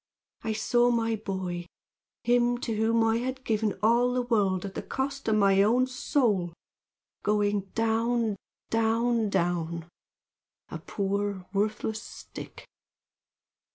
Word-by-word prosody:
I 220 - -2
saw 240 +3 +3
my 230 -1 +1
boy, 190 -4 -4 0.6
him 245 0 +3
to 225 -3 -2
whom 225 +1 +2
I 225 0 +3
had 260 +2 -3
given 215 -3 0
all 240 +3 +4
the 250 - +1
world 200 -6 +1
at 195 - -6
the - - -4
cost 275 0 -3
of 220 - +3
my 195 -2 +4
own 240 +5 +4
soul, 235 - 0 0.7
going 205 -2 +1
down, 225 0 +1 0.4
down, 225 0 +2
down, 170 -3 -1 0.8
a - - -6
poor 200 -1 -2
worthless 215 +2 -1
stick! - - -10
220 Hz, 120 wpm, -28 LUFS, 200-240 Hz, 0.8 s, all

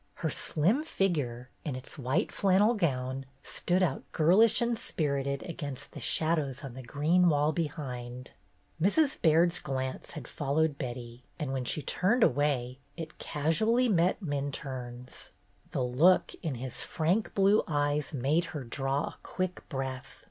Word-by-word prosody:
Her 160 - -2
slim 185 - +2
figure, 145 - -1
in 145 -5 -3
its 130 - -9
white 135 - 0
flannel 200 +3 +3
gown, 135 - -1 0.2
stood 180 +1 0
out 180 - 0
girlish 200 +8 +5
and 235 0 +1
spirited 140 - -1
against 145 -6 -6
the - - -8
shadows 155 -5 0
on 135 -3 -7
the 130 - -8
green 155 +8 +3
wall 150 0 +3
behind. 125 -6 -5 0.5
Mrs. 280 - +2
Baird's 170 +2 +4
glance 130 -3 -4
had 150 -7 -7
followed 145 +1 0
Betty, 120 -1 -6
and 145 -5 -3
when 130 -2 -2
she 150 - -1
turned 225 +6 +2
away, 130 -3 +1 0.2
it 160 -2 -7
casually 220 - +1
met 180 +1 +2
Min 145 -3 -2
turne's. 125 -2 -7 0.4
The - - -1
look 145 +10 +4
in 155 -6 -2
his 125 +1 -6
frank 175 +7 0
blue 200 +2 +5
eyes 145 -1 0
made 150 +5 +1
her 140 - -5
draw 135 +4 -1
a - - -6
quick 185 0 -4
breath. 135 -1 -5
150 Hz, 150 wpm, -30 LUFS, 130-175 Hz, 0.5 s, girlish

